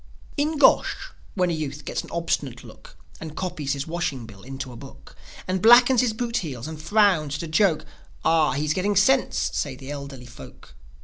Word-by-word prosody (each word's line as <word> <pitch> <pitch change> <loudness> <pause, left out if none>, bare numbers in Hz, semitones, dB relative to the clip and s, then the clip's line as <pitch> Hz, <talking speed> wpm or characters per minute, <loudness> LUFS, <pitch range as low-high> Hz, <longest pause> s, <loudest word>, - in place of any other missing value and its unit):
In 305 +2 0
Gosh, - - +3 0.2
when 180 -3 +1
a - - -1
youth 150 -2 -5
gets - - -2
an - - -12
obstinate 145 -7 -2
look, - - -15 0.2
And 160 -1 -8
copies 165 -6 -2
his 140 0 -4
washing 160 -7 -3
bill 100 -3 -13
into 135 +2 -7
a - - -10
book, - - -13 0.3
And 185 0 -1
blackens 240 +2 +7
his 245 -3 +1
boot 235 +1 -2
heels, 130 -7 -5
and 155 -1 -7
frowns 170 -5 +2
at 145 - -5
a - - -5
joke, 160 0 +2 0.4
"Ah, 160 -4 +3
he's 150 +2 0
getting 200 +4 0
sense," 255 +7 +2
say 140 -3 -2
the 135 +2 -9
elderly 140 -3 -8
folk. 120 - -14
160 Hz, 190 wpm, -24 LUFS, 140-200 Hz, 0.4 s, blackens